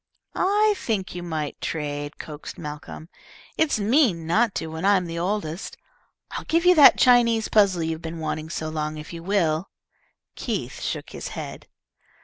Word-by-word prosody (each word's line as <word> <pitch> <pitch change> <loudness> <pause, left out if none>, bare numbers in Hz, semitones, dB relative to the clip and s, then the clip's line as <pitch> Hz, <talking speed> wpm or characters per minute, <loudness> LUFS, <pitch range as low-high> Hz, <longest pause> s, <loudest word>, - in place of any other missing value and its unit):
"I 415 +3 +3
think 205 - -2
you 175 - -5
might 155 -4 -4
trade," 145 -1 -4
coaxed 150 -1 -8
Malcolm. 150 +1 -8 0.5
"It's 320 -6 +2
mean 210 - +2
not 215 +6 +2
to - - -2
when 160 0 -6
I'm 195 -2 +3
the 170 0 -4
oldest. 180 -1 -3 0.5
I'll - - -5
give 335 +2 +1
you 360 - +8
that 300 -5 +8
Chinese 235 -3 +4
puzzle 195 -5 +3
you've 160 0 -3
been 165 0 -6
wanting 155 0 -4
so 160 -1 -4
long 155 0 -3
if 155 +2 -9
you 165 - -7
will." 170 -2 0 0.6
Keith - - -4
shook - - -4
his - - -6
head. - - -7
170 Hz, 160 wpm, -24 LUFS, 155-220 Hz, 0.6 s, you